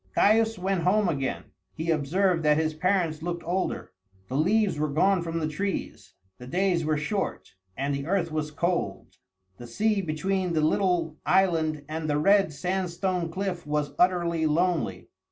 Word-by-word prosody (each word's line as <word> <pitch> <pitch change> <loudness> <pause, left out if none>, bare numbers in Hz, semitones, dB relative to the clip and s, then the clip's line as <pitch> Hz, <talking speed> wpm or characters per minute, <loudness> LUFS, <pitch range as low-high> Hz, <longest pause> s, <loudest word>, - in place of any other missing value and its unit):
Caius 220 +1 +4
went 185 0 -1
home 195 +4 +3
again. 135 -5 -3 0.2
He 165 +1 -1
observed 165 +4 +1
that 150 -1 +3
his 160 0 0
parents 165 -1 0
looked 170 0 -4
older. 180 +3 -2 0.4
The 130 - -4
leaves 190 +3 +2
were 155 0 0
gone 180 +6 +2
from 165 0 -3
the 155 -2 -1
trees, 150 - -4 0.2
the 125 - -10
days 180 +2 +1
were 155 0 +1
short, 190 +7 -3 0.2
and 140 +1 -1
the 140 +1 -4
earth 175 -3 0
was 155 -1 -2
cold. 170 +3 -2 0.4
The 120 - -9
sea 210 - +1
between 180 +2 -1
the 155 - +2
little 165 -1 +1
island 160 -6 +2
and 155 0 -4
the 145 - +1
red 195 +3 +4
sandstone 180 +2 -2
cliff 185 -2 -4
was 150 -1 -1
utterly 170 -3 +2
lonely. 155 - 0
170 Hz, 160 wpm, -26 LUFS, 155-190 Hz, 0.4 s, Caius